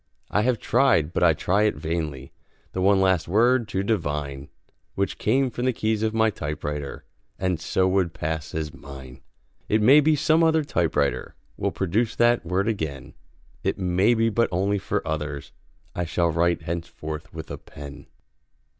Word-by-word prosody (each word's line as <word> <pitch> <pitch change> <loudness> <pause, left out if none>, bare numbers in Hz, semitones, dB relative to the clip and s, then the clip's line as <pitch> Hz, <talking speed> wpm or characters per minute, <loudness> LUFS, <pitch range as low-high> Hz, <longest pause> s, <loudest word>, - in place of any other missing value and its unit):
I 105 - +2
have 125 +1 +2
tried, 110 - +2
but - - -1
I 85 -2 +6
try 100 +7 +1
it 105 - +1
vainly, 75 -4 -4 0.4
The 95 - -3
one 100 +1 +4
last 95 -3 +2
word 120 +5 +3
to 95 -1 -2
divine 75 -9 -2 0.5
Which 100 0 -2
came 130 +4 +2
from 120 +2 -3
the 130 - +2
keys 110 -1 -1
of 110 0 +1
my 110 0 +2
typewriter 75 -4 -5 0.3
And 95 -3 -1
so 95 +3 +1
would 95 -2 +1
pass 80 -2 -4
as 80 -1 -3
mine. 65 -4 -11 0.5
It 110 - +3
may 130 +8 +7
be 155 +1 +3
some 155 +3 +3
other 160 -1 +3
typewriter 85 - 0 0.2
Will - - -1
produce 105 +5 0
that 120 0 +3
word 90 +4 0
again, 80 - -3 0.5
It - - 0
may 95 +5 +2
be, 115 0 +2
but 115 +2 +1
only 100 +3 +1
for 90 - -2
others 75 -2 -4 0.4
I 90 - -2
shall 85 +1 +1
write 85 +1 +1
henceforth 80 -2 -5
with 80 0 -8
a - - -6
pen. 70 -1 -11
95 Hz, 170 wpm, -24 LUFS, 80-110 Hz, 0.5 s, may